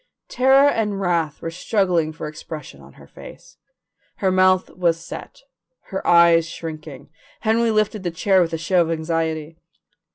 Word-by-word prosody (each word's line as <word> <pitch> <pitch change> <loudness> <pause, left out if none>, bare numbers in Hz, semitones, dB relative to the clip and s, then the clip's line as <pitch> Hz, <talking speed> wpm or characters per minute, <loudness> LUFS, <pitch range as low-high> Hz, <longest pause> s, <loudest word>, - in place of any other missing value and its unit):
Terror 270 +2 +4
and 210 -7 0
wrath 170 -5 -1
were 165 - -3
struggling 180 -3 0
for 155 - -7
expression 155 0 -9
on - - -16
her - - -16
face. - - -14 0.6
Her 190 -2 0
mouth 185 0 +3
was 170 -2 0
set, - - -10 0.5
her 190 - -3
eyes 170 -1 +5
shrinking. 155 -4 -9 0.3
Henry 230 +1 +2
lifted 215 -1 0
the 180 - -2
chair 185 +3 +2
with 165 -2 0
a 165 - -2
show 175 +2 +1
of 165 - 0
anxiety. 160 -1 -3
170 Hz, 155 wpm, -21 LUFS, 160-195 Hz, 0.6 s, eyes